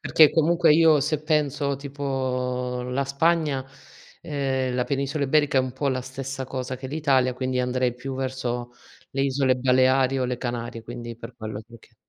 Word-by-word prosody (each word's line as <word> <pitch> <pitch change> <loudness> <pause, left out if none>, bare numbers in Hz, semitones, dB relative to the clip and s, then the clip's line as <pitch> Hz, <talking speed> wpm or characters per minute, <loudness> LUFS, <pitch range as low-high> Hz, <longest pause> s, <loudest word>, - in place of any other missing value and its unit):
Perché, 155 -2 +6
comunque 165 +1 +4
io 160 -2 +6
se 150 +1 -1
penso 145 -2 0
tipo 130 -3 -2
la 125 +2 -1
Spagna, 145 -1 +1 0.6
ehm, 135 -3 -1
la 125 - +1
penisola 140 +3 -2
Iberica 145 0 +3
è - - +6
un 130 -1 -3
po' 135 +3 -3
la 130 -1 0
stessa 135 +1 -6
cosa 130 0 -4
che 130 +1 -7
l'Italia, 135 -4 +2
quindi 130 0 -1
andrei 125 -1 0
più 130 +2 -6
verso 125 -2 -3 0.4
le 135 - -2
isole 135 -1 +2
Baleari 130 +1 +3
o 130 - 0
le 125 -1 -2
Canarie, 120 -2 -4
quindi 120 0 -7
per 115 +1 -10
quello 110 -2 -6
che 110 - -17
lo 115 0 -13
chie - - -23
130 Hz, 180 wpm, -25 LUFS, 125-140 Hz, 0.6 s, Perché